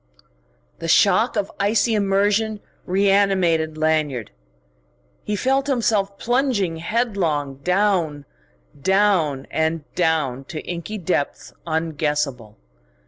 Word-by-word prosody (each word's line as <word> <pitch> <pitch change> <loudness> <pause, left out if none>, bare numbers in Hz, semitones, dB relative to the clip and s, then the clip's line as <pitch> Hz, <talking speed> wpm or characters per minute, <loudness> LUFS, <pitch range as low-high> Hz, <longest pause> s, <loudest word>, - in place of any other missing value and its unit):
The 165 - -5
shock 200 +8 +4
of 205 -2 -1
icy 210 +3 +2
immersion 205 +1 +1 0.3
reanimated 190 -5 +2
Lanyard. 155 -7 0 0.9
He 210 - -2
felt 270 +6 +1
himself 215 -7 0
plunging 240 -9 0
headlong 165 - -1
down, 180 -3 0 0.6
down, 185 -7 +2
and 160 0 0
down 155 -7 0
to 155 +3 -6
inky 175 +5 -5
depths 175 -6 -2
unguessable. 150 -8 -2
180 Hz, 90 wpm, -22 LUFS, 155-205 Hz, 0.9 s, shock